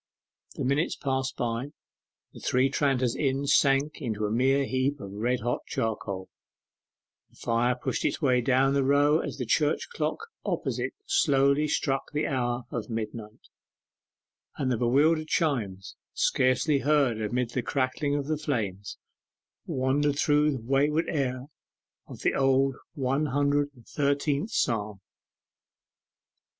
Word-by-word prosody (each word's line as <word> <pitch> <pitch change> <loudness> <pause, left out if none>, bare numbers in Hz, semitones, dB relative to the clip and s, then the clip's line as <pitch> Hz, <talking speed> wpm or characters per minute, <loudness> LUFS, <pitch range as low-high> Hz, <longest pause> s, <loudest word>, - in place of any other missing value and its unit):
The - - -3
minutes 140 +5 +1
passed 130 -1 -2
by. 120 +4 -2 0.6
The - - -11
Three 130 +1 +1
Tranters 130 -4 +1
Inn 135 -1 0
sank 140 +2 +2
into 110 -5 -2
a 105 - -2
mere 135 +4 +2
heap 130 +2 -1
of 100 -4 -8
red 120 +5 -1
hot 120 +2 -1
charcoal: 100 -4 -3 1.0
the - - -27
fire 120 +2 +1
pushed 125 - -3
its - - 0
way 130 -5 +3
down 135 +2 +3
the 140 -1 +2
row 145 +3 +4
as - - -5
the 125 - -3
church 150 - +1
clock - - -1 0.3
opposite - - -2
slowly 145 - +3
struck 135 -2 0
the 150 +1 0
hour 120 -3 -1
of 115 -1 -4
midnight, 110 -1 -6 1.1
and 130 -2 0
the 120 - +1
bewildered 150 +7 +3
chimes, 105 - -1 0.2
scarcely 130 +3 +2
heard 135 -6 +2
amid 120 +3 -1
the 125 - -1
crackling 135 +3 -1
of 145 -1 -1
the 155 0 -2
flames, 105 -10 -3 0.7
wandered 140 +2 +1
through 150 +1 +3
the 130 - -5
wayward 145 +6 +2
air 130 -4 -1 0.6
of - - -10
the - - +1
Old 135 0 +2 0.2
Hundred 145 +1 +1
and 120 -2 -18
Thirteenth 145 +4 0
Psalm. 105 - -1
135 Hz, 135 wpm, -27 LUFS, 120-145 Hz, 1.1 s, row